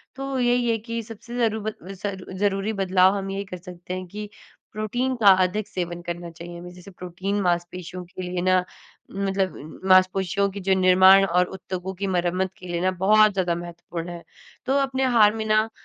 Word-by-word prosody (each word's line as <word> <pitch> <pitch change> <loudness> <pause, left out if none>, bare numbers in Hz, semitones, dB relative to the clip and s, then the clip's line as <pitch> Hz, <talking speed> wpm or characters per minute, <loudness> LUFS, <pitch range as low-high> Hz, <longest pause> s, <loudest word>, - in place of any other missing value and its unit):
तो 270 0 -3
यही 245 -1 +2
है 225 - +2
कि 230 +1 -5
सबसे 230 +2 -9
ज़रू 220 -2 +1
ब 215 +1 -3 0.2
ज़रू 195 -1 -6
ज़रूरी 200 +2 0
बदलाव 190 -1 +3
हम 195 0 -4
यही 200 +1 -4
कर 185 -1 -7
सकते 180 0 -9
हैं 185 0 -4
कि 210 +3 -7 0.4
प्रोटीन 245 +5 -2
का 225 -4 +2 0.2
अधिक 205 +3 -2
सेवन 175 -1 -4
करना 175 0 -6
चाहिए 170 +1 -9
हमें, 175 +1 -9
जैसे 180 +2 -13
प्रोटीन 185 +3 -4
मांसपेशियों 180 0 -2
के 185 +1 -9
लिए 180 0 -3
ना 185 0 +3 0.5
मतलब 195 -5 -3
मांसपेशियों 185 +1 +3
के 200 - -7
जो 190 0 +1
निर्माण 185 +1 +7
और 180 -1 +2
उद्योगों 185 0 -5
की 195 +2 -3
मरम्मत 180 0 0
के 180 - -11
लिए 175 -1 -2
ना, 185 +1 +2
बहुत 210 +4 +4
ज़्यादा 180 -3 0
महत्वपूर्ण 170 0 -7
है। 170 -1 -8 0.4
तो 265 - +1
अपने 265 -1 0
आहार 225 -5 +5
में 220 -1 -3
ना 215 +1 +2
190 Hz, 190 wpm, -24 LUFS, 180-215 Hz, 0.5 s, निर्माण